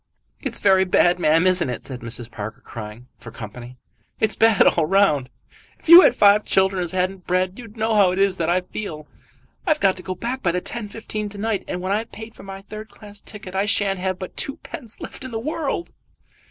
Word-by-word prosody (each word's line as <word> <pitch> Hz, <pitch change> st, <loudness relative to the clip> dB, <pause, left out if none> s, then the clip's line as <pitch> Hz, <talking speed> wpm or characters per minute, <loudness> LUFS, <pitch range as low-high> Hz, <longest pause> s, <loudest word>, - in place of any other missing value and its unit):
"It's -, -, -4 dB
very 190 Hz, -2 st, +4 dB
bad, 180 Hz, -1 st, +3 dB
ma'am; 165 Hz, +1 st, +3 dB
isn't 180 Hz, -6 st, +4 dB
it?" 125 Hz, -, -5 dB
said 130 Hz, -3 st, -5 dB
Mrs. 120 Hz, 0 st, -6 dB
Parker, 110 Hz, +3 st, -7 dB
crying 110 Hz, +1 st, -9 dB
for 115 Hz, -, -10 dB
company. 120 Hz, +3 st, -10 dB, 0.4 s
"It's 220 Hz, -1 st, +2 dB
bad 225 Hz, -2 st, +5 dB
all 160 Hz, -3 st, +3 dB
round. 155 Hz, -9 st, +3 dB, 0.5 s
If -, -, -19 dB
you 340 Hz, +2 st, +12 dB
had -, -, +4 dB
five 205 Hz, +1 st, +5 dB
children 190 Hz, -1 st, +2 dB
as 175 Hz, -, -1 dB
hadn't 185 Hz, 0 st, -2 dB
bread 185 Hz, +3 st, 0 dB
you'd 230 Hz, -2 st, -12 dB
know 220 Hz, +1 st, 0 dB
how 200 Hz, -3 st, +5 dB
it 180 Hz, -, -2 dB
is 195 Hz, -1 st, +2 dB
that 165 Hz, -1 st, -1 dB
I 180 Hz, +1 st, +2 dB
feel. 165 Hz, -5 st, -7 dB, 0.6 s
I've 310 Hz, -2 st, +2 dB
got 195 Hz, -1 st, +3 dB
to -, -, -7 dB
go 185 Hz, 0 st, -5 dB
back 240 Hz, +8 st, -4 dB
by 170 Hz, -3 st, +1 dB
the 180 Hz, -, 0 dB
10.15 215 Hz, 0 st, -5 dB
to 205 Hz, -, -10 dB
night, 215 Hz, -1 st, -1 dB
and 180 Hz, -, -4 dB
when 185 Hz, +1 st, -3 dB
I've 220 Hz, +3 st, -1 dB
paid 220 Hz, +1 st, -10 dB
for -, -, -14 dB
a 195 Hz, 0 st, -8 dB
third 215 Hz, +2 st, -9 dB
class 205 Hz, -1 st, -11 dB
ticket 200 Hz, -3 st, -10 dB
I 195 Hz, +2 st, 0 dB
shan't 200 Hz, -2 st, +1 dB
have 185 Hz, 0 st, -2 dB
but 185 Hz, 0 st, -8 dB
twopence 260 Hz, -4 st, -6 dB
left -, -, -8 dB
in 260 Hz, -, -6 dB
the 230 Hz, -, -4 dB
world." 305 Hz, +5 st, -3 dB
190 Hz, 220 wpm, -22 LUFS, 175-215 Hz, 0.6 s, you